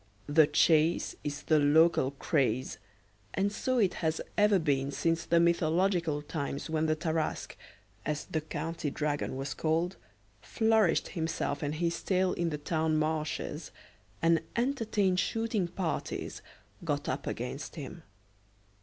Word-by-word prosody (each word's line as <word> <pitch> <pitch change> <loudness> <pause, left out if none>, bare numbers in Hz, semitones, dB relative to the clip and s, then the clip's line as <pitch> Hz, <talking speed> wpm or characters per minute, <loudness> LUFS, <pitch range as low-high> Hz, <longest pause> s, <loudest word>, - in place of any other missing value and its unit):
The 150 +1 +5
chase 160 +2 +3
is 145 0 -4
the 155 -1 +4
local 150 -1 +4
craze, 135 -5 0 0.6
and 200 +1 +1
so 255 +5 -1
it 200 -6 +3
has 160 -1 0 0.2
ever 210 -1 +5
been 140 -5 +1
since 165 +4 0
the 170 - +3
mythological 170 -1 +2
times 145 0 -4
when 160 0 +1
the 155 - +2
Tarasque, 160 0 -2 0.5
as 150 -1 -2
the 160 - -2
county 165 0 -3
dragon 145 -2 -2
was 135 +1 -3
called, 165 +4 0 0.4
flourished 220 - +2
himself 160 -4 -2
and 145 +1 -2
his 170 +1 -1
tail 185 -1 +1
in 170 -1 -1
the 150 - -3
town 155 +1 0
marshes, 155 0 -2 0.5
and 165 -1 +4
entertained 225 -7 +1
shooting 225 -4 0
parties 175 -1 -3 0.4
got - - -2
up - - -3
against - - -4
him. - - -7
160 Hz, 135 wpm, -30 LUFS, 150-180 Hz, 0.6 s, The